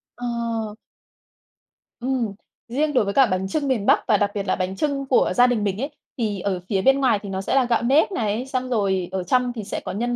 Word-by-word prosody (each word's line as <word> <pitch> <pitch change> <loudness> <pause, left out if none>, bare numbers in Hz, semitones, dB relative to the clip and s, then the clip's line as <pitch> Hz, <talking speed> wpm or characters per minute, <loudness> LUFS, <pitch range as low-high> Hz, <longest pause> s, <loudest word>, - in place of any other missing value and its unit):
Ờ. 230 -3 -3 1.2
Ừm. 245 -4 -1 0.3
Riêng 295 +6 0
đối 250 - +3
với 200 - -2
cả 270 +5 +6
bánh 190 -3 -1
chưng 285 +9 -1
miền 240 -7 0
Bắc - - +5
và 210 - +4
đặc 205 0 +1
biệt 200 -1 -3
là - - +2
bánh 185 0 -3
chưng 280 +3 -1
của 260 -2 +2
gia 245 0 +6
đình 240 -4 0
mình 200 +1 -1
ấy, 280 - -2 0.3
thì 215 -5 -1
ở 185 0 -1
phía 195 -3 +1
bên 270 +5 +4
ngoài 250 -6 +3
thì 200 - -7
nó 190 0 -3
sẽ 195 - -1
là 270 -2 +4
gạo 240 -1 +1
nếp 275 +10 +3
này, 225 - -1
xong 255 -1 -2
rồi 195 -6 0
ở 190 -1 -2
trong 250 +6 +1
thì 225 -3 -6
sẽ - - -4
có - - -6
nhân 240 +4 -1
230 Hz, 240 wpm, -23 LUFS, 200-255 Hz, 1.2 s, cả